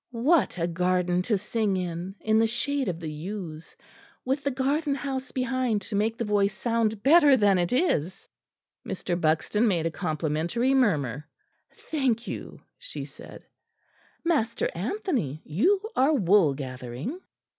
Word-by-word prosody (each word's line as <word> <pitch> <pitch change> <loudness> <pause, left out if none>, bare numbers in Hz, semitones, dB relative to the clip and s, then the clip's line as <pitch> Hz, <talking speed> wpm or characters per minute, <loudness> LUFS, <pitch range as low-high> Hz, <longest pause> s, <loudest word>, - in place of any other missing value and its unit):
What 305 - +3
a 170 - 0
garden 180 +1 +1
to 210 +3 +1
sing 205 0 -1
in, 180 +1 -4
in 220 0 +3
the 225 - +4
shade 265 +4 -1
of 170 -2 -4
the 160 -2 -5
yews, 165 0 -7 0.5
with 270 +2 -1
the 280 - +1
garden 280 +3 0
house 265 -2 -4
behind 255 -4 0
to 205 - -4
make 220 +3 0
the 235 - -2
voice 205 -1 +1
sound 225 -3 0
better 290 -1 +6
than 200 -4 +4
it 175 -1 0
is!" 190 - 0 0.6
Mr. 180 - -4
Buxton 165 +8 +2
made 170 -6 +1
a 165 - 0
complimentary 165 - -1
murmur. 150 - +1 0.4
"Thank 255 -7 -1
you," - - -7 0.2
she - - -6
said, - - -13 0.8
"Master 240 -9 +1
Anthony, 205 - -2
you 320 - +2 0.2
are 285 +4 +4
wool 190 - +4
gathering." 130 - -6
210 Hz, 145 wpm, -26 LUFS, 170-260 Hz, 0.8 s, better